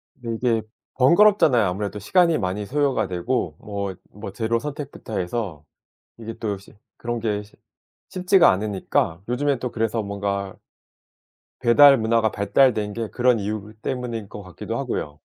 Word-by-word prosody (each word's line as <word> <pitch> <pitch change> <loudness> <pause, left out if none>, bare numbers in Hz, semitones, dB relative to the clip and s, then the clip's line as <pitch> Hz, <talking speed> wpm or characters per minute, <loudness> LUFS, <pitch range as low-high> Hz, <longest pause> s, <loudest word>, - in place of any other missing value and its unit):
근데 115 -2 -5 0.3
이게 - - -5 0.3
번거롭잖아요. 150 - +5
아무래도 100 +3 -3
시간이 170 - +3
많이 100 +1 -2
소요가 140 +3 0
되고 90 -2 -2
뭐 100 -3 -4 0.2
뭐 105 0 -8
재료 115 +3 -1
선택부터 140 -6 -6
해서. 90 -5 -4 0.6
이게 115 0 -6
또 105 -3 -2
쉬 95 - -17 0.2
그런 120 0 -3
게 105 -2 -2
쉬 105 - -20 0.6
쉽지가 185 0 +4
않으니까 95 -3 -1
요즘에 135 +1 0
또 125 - -3
그래서 115 0 -1
뭔가 100 -1 -3 1.0
배달 135 +3 +7
문화가 110 -1 +1
발달된 105 +1 +2
게 115 -1 -4
그런 125 -2 +2
이유 105 +1 -4
때문인 120 -5 -4
것 105 - -9
같기도 95 -3 -6
하고요. 75 0 -4
110 Hz, 315 characters per minute, -23 LUFS, 100-125 Hz, 1.0 s, 배달